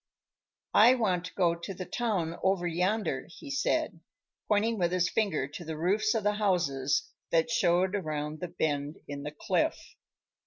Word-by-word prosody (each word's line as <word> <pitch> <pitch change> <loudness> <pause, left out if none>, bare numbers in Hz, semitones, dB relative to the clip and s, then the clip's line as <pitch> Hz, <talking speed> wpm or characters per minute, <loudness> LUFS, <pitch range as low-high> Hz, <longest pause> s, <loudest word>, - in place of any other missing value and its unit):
"I 235 +5 +7
want 185 -7 0
to 180 - -8
go 175 -3 +3
to 170 +3 -7
the 185 - -5
town 185 -9 -2
over 190 -2 +1
yonder," 180 -2 0
he 280 - -10
said, 280 - 0 0.5
pointing 220 +1 +2
with 175 -1 +1
his 180 0 +1
finger 195 -11 0
to 155 +4 -8
the 160 -1 -5
roofs 210 +7 +1
of 220 - 0
the 210 0 +2
houses 145 -9 +1 0.2
that 165 +8 +2
showed 185 -4 +2
around 155 -4 -3
the 180 - -3
bend 150 -4 -2
in 140 0 -5
the 145 - -4
cliff. 150 - 0
180 Hz, 165 wpm, -29 LUFS, 160-210 Hz, 0.5 s, I